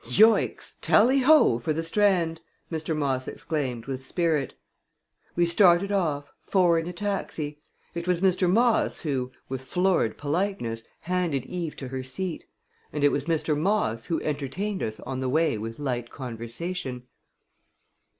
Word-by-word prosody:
"Yoicks! 220 +2 +3
Tally 255 +6 +5
ho, 270 - +5
for 155 +6 -1
the 165 +2 -2
Strand!" 170 -3 +2 0.3
Mr. 160 -1 -2
Moss 135 -3 -1
exclaimed, 130 -8 -3
with 130 -1 -5
spirit. 160 -1 0 0.8
We 175 - +3
started 175 +2 +4
off 150 -8 -1
four 175 -4 +3
in 165 - -4
a - - -3
taxi. 170 -6 -3 0.3
It 170 +1 -5
was 180 -2 +2
Mr. 185 -1 +3
Moss 230 +4 +3
who, 130 -5 -2 0.2
with 130 -1 -4
florid 180 - +1
politeness, 150 - -2 0.2
handed 170 -7 -1
Eve 170 -2 -4
to 130 - -7
her 130 0 -4
seat; 165 +7 -5 0.5
and 150 -1 -2
it 145 - +6
was 140 -1 -1
Mr. 160 -2 +1
Moss 150 - 0
who 165 - -1
entertained 155 +8 -2
us 110 0 -3
on 130 - -4
the 130 -1 -1
way 160 0 +2
with 115 +1 -5
light 125 -5 -3
conversation. 125 +4 -5
160 Hz, 150 wpm, -26 LUFS, 130-180 Hz, 0.8 s, it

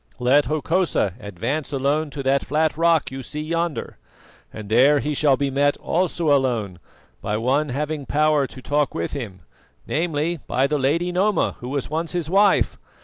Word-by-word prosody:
Let 130 +4 +3
Hokosa 155 - 0
advance 115 - -4
alone 145 +3 0
to 140 -1 -6
that 135 +1 +2
flat 155 +1 0
rock 165 -2 +2
you 135 0 -6
see 150 +4 -6
yonder, 165 0 -3 0.5
and 105 -1 -8
there 130 +7 +5
he 150 +1 -1
shall 140 -2 +3
be 140 0 -1
met, 145 +1 +2
also 170 -3 0
alone, 115 -9 -1 0.4
by 105 - -2
one 135 +6 +1
having 150 +2 -3
power 150 -2 +2
to 130 - -12
talk 145 -1 0
with 85 0 -3
him, 110 -10 -6 0.4
namely, 165 +1 -1
by 130 +2 +1
the 150 +1 0
Lady 165 +7 +1
Noma, 195 +3 +1
who 125 - -7
was 140 +1 -3
once 165 +2 -2
his 170 -2 -3
wife. 200 +1 +3
145 Hz, 170 wpm, -22 LUFS, 130-155 Hz, 0.5 s, there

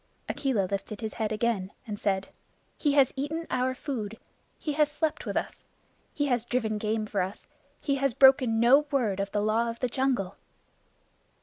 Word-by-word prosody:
Akela 250 -9 0
lifted 200 +3 -4
his 220 -1 -4
head 220 -1 -2
again 215 -3 0 0.2
and 210 -3 -5
said, 195 -1 0 0.5
"He 290 -2 +1
has 275 -3 +4
eaten 305 +5 -3
our 255 +1 +1
food. 225 -6 -4 0.4
He 300 - -3
has 300 0 +2
slept 305 +1 -2
with - - -1
us. - - -4 0.5
He 290 - -1
has 245 -5 +1
driven 225 -3 -1
game 215 +1 -1
for 205 -2 -1
us. 190 +4 -5 0.3
He 280 -2 0
has 275 -3 0
broken 260 -4 +6
no 270 +6 +5
word 230 -9 0
of 195 0 -2
the 205 0 0
Law 225 +2 +2
of 230 - -6
the 250 - 0
Jungle." 245 -8 0
235 Hz, 180 wpm, -28 LUFS, 210-275 Hz, 0.5 s, broken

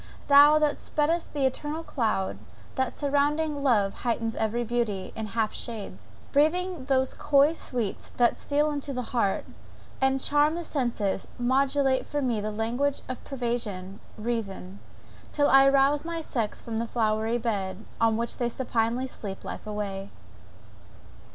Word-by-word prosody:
thou 290 +2 +8
that 300 -1 +1
spreadest 325 +3 0
the 285 -2 0
ethereal 295 +5 -2
cloud 220 -10 -1 0.3
that 260 -1 0
surrounding 290 +1 0
love 215 -8 +3
heightens 230 -2 -1
every 225 +2 0
beauty, 230 -5 -2
it 220 - -3
half 220 0 -1
shades, 225 -4 -5 0.2
breathing 320 +1 +1
those 265 -1 +1
coy 285 +2 +4
sweets 240 -10 -4
that 240 -1 +4
steal 295 +1 +1
into 285 -1 -4
the 250 -1 -2
heart, 205 -5 +1 0.6
and 265 0 +3
charm 295 +3 +3
the 345 - -3
senses 240 - -1
modulate 265 +1 +2
for 295 - -2
me 240 -6 0
the 210 - -2
language 235 +6 -1
of 255 - -6
persuasive 235 -7 -4 0.2
reason, 210 -4 -4 0.5
till 290 -1 +2
I 270 0 +8
rouse 275 +1 +3
my 335 0 -3
sex 235 -9 -3
from 225 -1 -3
the 230 - -2
flowery 220 0 0
bed, 205 -4 -3
on 225 -1 +3
which 235 0 -2
they 240 -1 +1
supinely 240 0 -1
sleep 200 -6 -7
life - - -7
away! 200 -2 -4
245 Hz, 145 wpm, -27 LUFS, 220-285 Hz, 0.6 s, thou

